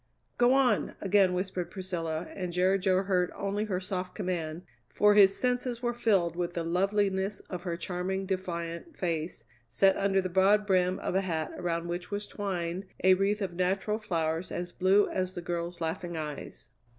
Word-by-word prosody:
"Go 245 +1 +5
on!" 250 -6 +2
again 195 -2 +3
whispered 185 -1 -2
Priscilla, 170 -4 -3
and 180 -2 -4
Jerry 185 +2 +2
Jo 190 0 +2
heard 180 -2 +1
only 200 +2 -2
her 190 -4 -1
soft 185 -1 -4
command, 175 -4 -3 0.3
for 210 0 +4
his 195 -1 +6
senses 250 -1 -1
were 240 0 +1
filled 195 -8 +2
with 175 +1 -3
the 170 - -1
loveliness 195 +3 0
of 180 -2 -4
her 170 -2 -2
charming, 185 +2 -3
defiant 180 - -4
face 165 -2 -2 0.3
set 190 +12 +4
under 195 -1 +2
the 185 - 0
broad 195 +3 +4
brim 185 -2 +2
of - - -3
a 190 - +2
hat 160 -5 -2
around 170 -1 -2
which 175 +1 -4
was 205 0 -3
twined 185 -2 -3 0.2
a 185 0 +7
wreath 200 +2 +1
of 185 -2 -3
natural 190 +4 0
flowers 165 -4 -2
as 175 0 -4
blue 190 +3 +4
as 185 0 -2
the 175 - -4
girl's 170 0 -3
laughing 170 +1 -3
eyes. 150 -2 -6
185 Hz, 175 wpm, -29 LUFS, 175-200 Hz, 0.3 s, a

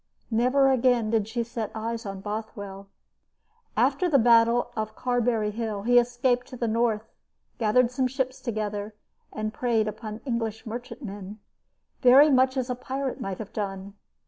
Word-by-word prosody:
Never 255 +4 +3
again 245 -3 +2
did 220 -3 +1
she 235 +1 -2
set 230 -2 -4
eyes 225 0 -4
on 195 -1 -6
Bothwell. 205 -2 -6 0.9
After 365 -2 +2
the 290 - +5
battle 235 0 +4
of 215 -1 -3
Carberry 240 -4 0
Hill 215 -2 -4
he 245 +2 +6
escaped 245 +1 0
to 255 - -9
the 235 - -1
north, 225 -1 +1 0.6
gathered 235 +2 +3
some 255 0 +1
ships 260 0 -3
together, 210 -3 -3 0.4
and 215 0 -4
preyed 230 -4 +1
upon 215 0 -6
English 225 -4 -3
merchantmen, 215 -4 -7 0.6
very 275 +4 +7
much 260 0 +3
as 255 -1 -1
a 250 - -1
pirate 265 +1 -4
might 195 -1 -4
have 220 - -8
done. 195 -1 -4
230 Hz, 150 wpm, -26 LUFS, 215-250 Hz, 0.9 s, very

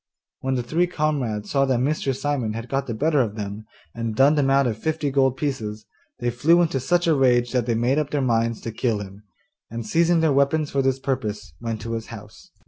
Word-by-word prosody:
When 130 0 -1
the 125 - -1
three 165 +8 +1
comrades 135 -11 -2
saw 135 -1 +3
that 130 -2 +1
Mr. 135 0 0
Simon 135 -5 -1
had 115 +2 -6
got 135 0 -1
the 120 - -3
better 150 +3 +2
of 110 -4 -2
them, 105 0 -6 0.3
and 115 -2 -3
done 135 +5 +5
them 145 -3 +2
out 135 0 +4
of 110 -3 -2
fifty 155 +1 -1
gold 135 -1 +2
pieces, 110 -7 -3 0.3
they 120 0 -1
flew 155 +9 +4
into 155 -5 0
such 175 +7 +1
a 165 - +4
rage 125 -3 +3
that 125 -2 0
they 115 - +1
made 125 +6 +2
up 150 -2 -2
their 145 - -1
minds 115 -3 0
to 115 - -5
kill 110 0 0
him, 100 0 -9 0.5
and, 115 0 -5
seizing 170 +8 +3
their 160 -3 +3
weapons 140 +2 +2
for 140 - +1
this 135 -1 +1
purpose, 110 - -3
went 115 -2 -4
to 115 +1 -4
his 115 -1 -4
house. 110 - -12
130 Hz, 225 wpm, -23 LUFS, 115-145 Hz, 0.5 s, done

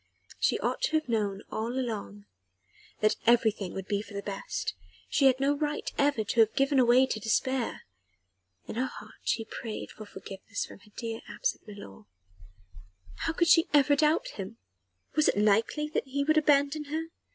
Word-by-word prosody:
She - - +2
ought - - -1
to - - -4
have 310 - -3
known 210 -4 -1
all 225 +2 -2
along 155 - -4 0.8
that 215 0 +3
everything 220 -5 +3
would 190 - -4
be 205 0 -1
for 205 -1 -11
the 200 - -4
best: 200 -1 -3 0.3
she 275 - +4
had 260 0 +3
no 280 +2 +2
right 295 0 -2
ever 280 -6 +2
to 230 - -2
have 220 -1 +5
given 275 -1 +4
way 250 +2 +6
to 240 -4 -3
despair. 240 +4 0 0.8
In - - -6
her 260 +2 +1
heart - - -11
she 225 - -1
prayed 220 -1 -6
for 215 - -10
forgiveness 195 +1 -6
from - - -13
her 210 +1 -21
dear 225 -1 -4
absent - - -2
milor. 200 - -11 1.2
How - - 0
could 340 +1 +2
she 330 0 +6
ever 285 0 +5
doubt 305 +2 +2
him? 200 +3 -7 0.6
Was 305 -1 +3
it - - 0
likely 220 +8 +2
that 300 - -2
he 280 +2 -1
would 310 +2 +4
abandon 295 0 +2
her? 320 +3 -3
240 Hz, 175 wpm, -29 LUFS, 210-285 Hz, 1.2 s, way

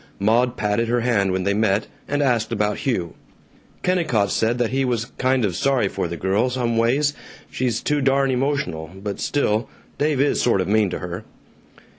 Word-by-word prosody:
Maud 120 +5 +2
patted 105 +2 0
her 120 +1 +1
hand 105 -5 +1
when 95 0 -1
they 100 +2 +1
met, 105 0 +1 0.2
and 145 0 0
asked 120 -5 +1
about 105 -2 0
Hugh. 110 - -1 0.7
Kennicott 150 - +1
said 115 +2 +1
that 120 -2 0
he 135 +1 +1
was 120 -1 -1
"kind 130 -2 +2
of 90 -4 -2
sorry 135 -3 +2
for 90 - -2
the 85 0 -5
girl, 100 +8 +1
some 120 -2 -1
ways; 135 +6 +2 0.4
she's 120 -3 -1
too 150 -1 +1
darn 135 0 +2
emotional, 125 - -1
but 100 +1 -5
still, 120 -5 0 0.3
Dave 150 -2 +1
is 145 +1 +2
sort 115 -5 +2
of 95 - 0
mean 105 -1 +3
to 90 - -3
her." 90 0 -6
115 Hz, 185 wpm, -22 LUFS, 100-130 Hz, 0.7 s, mean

